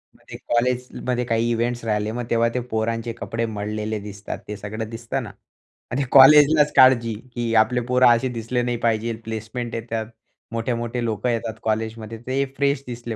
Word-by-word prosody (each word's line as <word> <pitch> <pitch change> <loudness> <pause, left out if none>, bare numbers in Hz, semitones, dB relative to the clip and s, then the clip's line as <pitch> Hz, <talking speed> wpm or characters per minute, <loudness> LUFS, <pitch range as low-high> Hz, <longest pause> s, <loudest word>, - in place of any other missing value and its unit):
म्हणजे - - -11
कॉलेजमध्ये 125 0 0
काही 115 0 0
इव्हेंट्स 120 +1 -1
राहिले, 105 0 0
मग 120 +1 -4
तेव्हा 115 0 +2
ते 125 - 0
पोरांचे 115 +1 -1
कपडे 115 0 -3
मळलेले 105 0 -3
दिसतात, 100 0 -7
ते 105 - -5
सगळं 105 +2 -6
दिसतं 120 +3 -4
ना. 105 - -8 0.6
आणि 135 +3 0
कॉलेजलाच 150 +2 +7
काळजी 120 -3 +6 0.2
की 120 -1 -1
आपले 120 +3 +3
पोरं 125 0 +5
असे 115 +3 -1
दिसले 120 +2 -1
नाही 120 0 -1
पाहिजे, 115 0 0
प्लेसमेंट 115 +2 -5
येतात. 115 -1 -3 0.5
मोठे-मोठे 120 +1 -2
लोकं 110 +1 -1
येतात 115 -1 -2
कॉलेजमध्ये, 110 0 -3
ते 135 +2 +1
फ्रेश 140 -1 +1
दिसले 120 -1 -5
115 Hz, 160 wpm, -22 LUFS, 110-125 Hz, 0.6 s, कॉलेजलाच